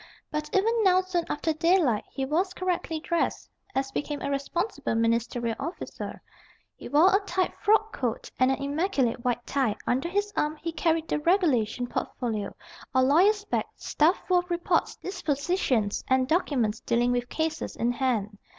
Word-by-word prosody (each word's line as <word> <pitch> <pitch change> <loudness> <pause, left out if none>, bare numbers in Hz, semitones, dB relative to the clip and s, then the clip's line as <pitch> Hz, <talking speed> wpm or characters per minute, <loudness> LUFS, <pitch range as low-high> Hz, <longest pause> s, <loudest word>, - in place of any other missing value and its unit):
But 300 0 -3
even 420 +4 +3
now, 370 -1 +5
soon 365 -2 -2
after 315 +2 0
daylight, 315 - +2
he 270 - -3
was 360 +7 0
correctly 355 -3 -2
dressed, 340 +1 -1 0.3
as 270 0 -1
became 290 +1 -3
a - - -1
responsible 290 - -2
ministerial 230 0 0
officer. 330 +6 -6 0.5
He - - -9
wore 335 +7 +5
a - - +5
tight 370 -1 0
frock 435 +1 +3
coat 240 -4 -3
and 255 0 +5
an 265 - 0
immaculate 280 -4 0
white 245 -1 -1
tie; 260 -7 0
under 265 +7 0
his 410 +2 -1
arm 300 +1 0
he 330 +2 -5
carried 325 0 0
the - - 0
regulation 295 - +2
portfolio, 220 -4 -3 0.4
or 260 - +5
lawyer's 390 +10 +4
bag, - - -1
stuffed 320 +5 +1
full 365 -1 +4
of 355 0 -6
reports, 345 0 0
dispositions, 285 - -1
and 260 0 +2
documents 260 - +1
dealing 240 +1 +1
with 245 0 -1
cases 320 0 -2
in 235 +1 +1
hand. 230 -5 -1
300 Hz, 160 wpm, -27 LUFS, 245-360 Hz, 0.5 s, now